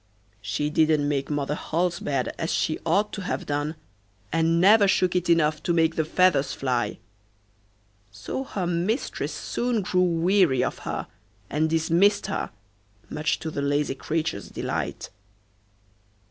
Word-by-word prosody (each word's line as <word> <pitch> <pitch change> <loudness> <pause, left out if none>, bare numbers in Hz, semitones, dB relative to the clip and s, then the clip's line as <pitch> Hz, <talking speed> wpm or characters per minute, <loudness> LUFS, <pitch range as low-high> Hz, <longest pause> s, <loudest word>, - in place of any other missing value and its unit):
She 110 +9 -2
didn't 155 -2 +3
make 140 -2 -1
Mother 145 -1 -1
Holle's 175 +3 -1
bed 135 -3 -2
as 165 - -1
she 155 - 0
ought 200 +6 +2
to 200 - -4
have 185 - -3
done, 145 +2 -2 0.6
and 165 +1 +2
never 200 +3 +6
shook 185 -1 +2
it 180 -1 0
enough 155 -2 +3
to 170 - 0
make 165 -1 +3
the 160 - 0
feathers 165 -4 +2
fly. 125 -3 -1 1.1
So 105 - -5
her 200 -9 -3
mistress 175 +8 -1
soon 240 -4 -2
grew 180 0 +1
weary 175 -5 +3
of - - -3
her, - - -3 0.5
and 155 +2 +1
dismissed 165 +6 +3
her, - - -3 0.6
much 155 +2 0
to 160 - -4
the 145 - -3
lazy 145 0 0
creature's 155 -6 -3
delight. - - -4
160 Hz, 145 wpm, -25 LUFS, 145-180 Hz, 1.1 s, never